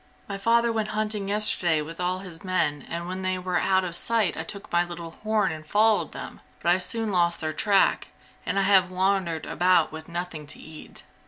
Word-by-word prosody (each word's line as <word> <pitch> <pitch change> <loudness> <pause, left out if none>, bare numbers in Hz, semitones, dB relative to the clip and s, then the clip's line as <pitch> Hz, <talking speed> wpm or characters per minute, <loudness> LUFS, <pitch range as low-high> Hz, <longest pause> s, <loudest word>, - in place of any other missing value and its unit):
"My 200 -1 -5
father 230 +3 +3
went 220 -2 -1
hunting 210 -2 +1
yesterday 195 -6 +3
with 165 +3 -7
all 180 +1 0
his 165 -3 -9
men 150 -7 0
and 170 +1 -4
when 185 +1 -5
they 185 0 -1
were 180 -1 -1
out 190 -1 +2
of 175 -2 -5
sight 225 0 +1
I - - -4
took 200 +5 -5
my 175 0 +3
little 170 -1 -8
horn 215 -3 +1
and 155 -1 -7
followed 210 +6 +2
them, - - -8 0.2
but 170 - +2
I 180 - +3
soon 225 +1 -2
lost 175 -2 +1
their 155 -1 -2
track, 200 +4 +2 0.4
and - - -2
I 195 - +3
have 190 -2 +4
wandered 185 -3 0
about 180 -1 +2
with 160 +1 -9
nothing 170 -3 -5
to 150 - -9
eat. 155 -1 -11
185 Hz, 210 wpm, -25 LUFS, 170-200 Hz, 0.4 s, have